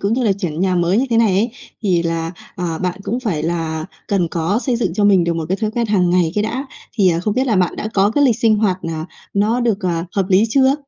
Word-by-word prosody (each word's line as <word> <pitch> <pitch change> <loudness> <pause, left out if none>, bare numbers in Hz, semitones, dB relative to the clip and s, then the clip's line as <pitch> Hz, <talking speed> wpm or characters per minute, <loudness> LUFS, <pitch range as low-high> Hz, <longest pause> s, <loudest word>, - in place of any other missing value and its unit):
cũng 200 +2 0
như 250 +1 +1
là 205 - +3
chuyển 175 -5 -4
nhà 185 -1 +2
mới 175 +2 +2
như 270 - +1
thế 230 - +2
này 225 -4 +4
ấy, 210 +6 +1 0.3
thì 180 -5 +2
là, 165 0 -2 0.2
ờ, 170 -3 -3
bạn 185 +1 -3
cũng 240 +4 -2
phải 180 -12 -2
là 160 -1 -2 0.2
cần 185 -4 +1
có 170 +5 0
xây 250 -1 -1
dựng 210 -8 -1
cho 205 +1 +1
mình 190 -4 +5
được 170 - 0
một 165 -1 -2
cái 190 - 0
thói 215 0 -2
quen 235 0 -1
hàng 185 -4 +2
ngày 175 -3 +2
cái 210 - +1
đã. 260 +5 -3 0.3
Thì, 195 -4 +4
ờ, 165 - 0
không 205 +3 -1
biết 260 +1 +1
là 220 -6 +2
bạn 180 -1 +1
đã 215 - -3
có 200 +1 +3
cái 290 +4 +2
lịch 240 -5 +3
sinh 220 -2 +3
hoạt, 205 -4 +1
à, 160 0 -4 0.3
nó 215 +5 +2
được, 225 -4 0
ờ, 170 -2 -1
hợp 195 - +2
lý 195 +2 +4
chưa? 265 +3 +4
195 Hz, 280 wpm, -18 LUFS, 170-220 Hz, 0.3 s, mình